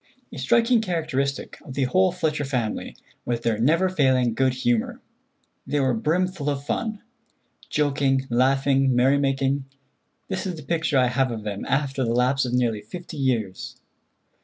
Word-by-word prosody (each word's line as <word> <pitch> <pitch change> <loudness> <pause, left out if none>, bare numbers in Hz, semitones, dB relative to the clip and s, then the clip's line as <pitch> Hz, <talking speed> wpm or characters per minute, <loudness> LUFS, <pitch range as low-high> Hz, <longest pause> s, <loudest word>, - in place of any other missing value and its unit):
A - - -7
striking 235 0 +3
characteristic 155 -8 -2
of 130 - -9
the 140 - +1
whole 185 +7 +3
Fletcher 155 -4 -1
family 125 -6 -3 0.3
was 120 -1 -2
their 115 -2 0
never 165 +10 +3
failing 130 -9 +2
good 130 +2 +1
humor; 120 -3 0 0.7
they 145 +2 0
were 130 -2 +2
brimful 160 +5 0
of 140 -1 -2
fun. 215 +6 -3 0.7
Joking, 140 -2 +1
laughing, 135 +1 +3
merry 135 +3 +4
making—this 135 +7 -3
is 180 - -3
the 155 - -10
picture 160 -2 0
I 130 - +5
have 130 +1 +1
of 115 -3 -5
them 100 -2 -4
after 135 -1 0
the 115 -1 0
lapse 130 +2 +2
of 125 - -3
nearly 120 -4 +1
fifty 175 - -9
years. 115 -9 -2
135 Hz, 155 wpm, -24 LUFS, 125-155 Hz, 0.7 s, I